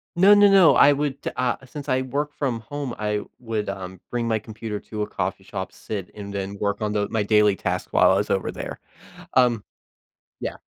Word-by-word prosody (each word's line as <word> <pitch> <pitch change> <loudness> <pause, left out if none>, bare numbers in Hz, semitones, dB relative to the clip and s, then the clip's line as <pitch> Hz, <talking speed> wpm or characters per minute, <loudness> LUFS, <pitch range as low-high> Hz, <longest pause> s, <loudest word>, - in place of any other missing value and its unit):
No, 195 +4 +7
no, 205 0 +7
no. 195 -4 +7
I 145 - +7
would 140 -1 -1 0.2
a 125 0 +1
since 145 +1 -8
I 130 0 +2
work 145 +3 -3
from 130 -5 -1
home, 140 +2 -5
I 105 -1 -1 0.2
would, 115 -3 -3
um, 95 -2 -6
bring 120 -1 -1
my 110 -1 +2
computer 110 -1 -6
to 105 0 -6
a 105 - -1
coffee - - -3
shop, - - -5
sit, 100 -4 -6
and 100 -1 -7
then 100 0 -4
work 100 0 -1
on 105 -1 -1
the 105 -1 0
my 110 -2 0
daily 105 -1 +4
tasks 90 -1 -3
while - - +5
I 95 - +3
was 105 - -1
over 95 - 0
there. - - -7 0.6
Um 120 -4 +4 0.8
yeah. - - -4
110 Hz, 210 wpm, -24 LUFS, 105-135 Hz, 0.8 s, No